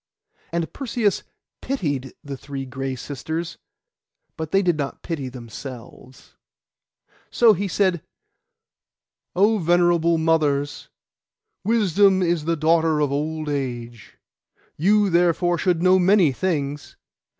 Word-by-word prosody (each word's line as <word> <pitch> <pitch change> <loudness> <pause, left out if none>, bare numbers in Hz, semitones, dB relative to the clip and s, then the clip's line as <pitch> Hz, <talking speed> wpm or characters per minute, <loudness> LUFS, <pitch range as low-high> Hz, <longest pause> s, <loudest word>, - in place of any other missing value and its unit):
And 170 -1 -3
Perseus 235 -6 -1 0.4
pitied 145 - -3
the 140 -2 -6
three 135 0 -7
Gray 135 0 -4
Sisters; 160 +6 -5 0.8
but 160 -2 -5
they 195 +3 +2
did 175 -3 +2
not 140 -2 -5
pity 145 -6 -4
themselves. 125 +1 -11 0.9
So 230 -2 +5
he 200 +1 -2
said, 185 -3 +1 1.3
'Oh, 210 +4 +3
venerable 170 -1 +3
mothers, 150 -3 0 0.7
wisdom 200 -3 +3
is 170 -3 0
the 165 0 0
daughter 160 0 +2
of 145 -2 +1
old 155 +2 -2
age. 120 -5 -5 0.6
You 200 +4 +3
therefore 175 0 +2
should 175 -3 +1
know 185 0 +5
many 185 -4 +4
things. 145 -2 -3
165 Hz, 110 wpm, -22 LUFS, 140-185 Hz, 1.3 s, So